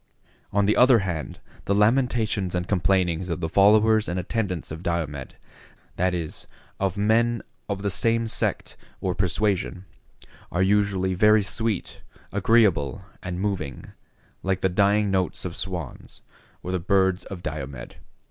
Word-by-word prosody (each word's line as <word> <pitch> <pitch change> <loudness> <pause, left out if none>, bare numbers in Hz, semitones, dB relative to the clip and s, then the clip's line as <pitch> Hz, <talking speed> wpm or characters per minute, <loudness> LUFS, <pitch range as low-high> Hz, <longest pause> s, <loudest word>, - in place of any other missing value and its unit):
On 100 0 +2
the 105 - +3
other 125 0 +6
hand, 85 -4 -4 0.3
the 100 - +1
lamentations 110 -4 +1
and 90 0 -2
complainings 90 -2 +1
of 85 - -2
the 80 - -2
followers 105 +4 +4
and 90 +1 -2
attendants 95 -4 -3
of 80 +1 -6
Diomed, 80 -6 -3 0.6
that 90 0 +1
is, 80 -3 -4 0.3
of 95 0 -1
men 115 +3 +2 0.3
of 100 0 -3
the 100 - 0
same 115 +3 +1
sect 110 - -2 0.2
or 95 - -1
persuasion, 95 0 -1 0.7
are 90 - +1
usually 95 -1 +2
very 105 +3 +5
sweet, 110 0 -2 0.3
agreeable, 100 - +2 0.2
and 90 -1 -4
moving, 95 -10 -3 0.5
like 95 -1 -1
the 95 - +2
dying 100 +2 +2
notes 95 -1 -1
of 90 -2 -4
swans, 85 -7 -6 0.4
or 90 - -4
the 90 - 0
birds 95 0 +2
of 90 -3 -8
Diomed. 65 -2 -6
95 Hz, 140 wpm, -25 LUFS, 90-105 Hz, 0.7 s, other